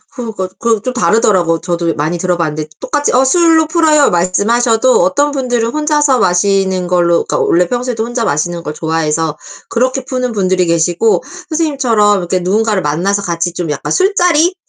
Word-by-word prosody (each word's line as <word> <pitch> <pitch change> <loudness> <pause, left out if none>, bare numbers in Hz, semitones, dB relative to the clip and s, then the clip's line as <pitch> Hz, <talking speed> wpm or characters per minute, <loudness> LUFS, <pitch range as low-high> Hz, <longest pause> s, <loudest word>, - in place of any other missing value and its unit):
그러니까 220 -7 -5
그 230 -2 0
좀 255 +4 -4
다르더라고요. 195 -8 +1
저도 170 -1 -2
많이 160 +3 -2
들어봤는데 165 -4 -2
똑같이 290 -1 -1
"어, 255 - +4
술로 320 +2 +3
풀어요." 315 -3 +3
말씀하셔도 225 +7 +2
어떤 285 +1 +1
분들은 245 -4 -1
혼자서 300 -3 +1
마시는 190 0 +1
걸로 170 -1 +2
그러니까 - - -2
원래 175 +1 +2
평소에도 245 -1 -2
혼자 240 -1 -3
마시는 170 +3 -2
걸 150 - -5
좋아해서 160 -1 -2 0.3
그렇게 255 +2 -1
푸는 255 -2 -3
분들이 185 -3 +1
계시고 170 +6 +1 0.3
선생님처럼 260 - +1
이렇게 185 +1 -2
누군가를 205 +2 0
만나서 180 +7 -1
같이 170 -2 -2
좀 170 -2 -4
약간 150 - -4
술자리 360 -3 +2
205 Hz, 415 characters per minute, -13 LUFS, 175-255 Hz, 0.3 s, 어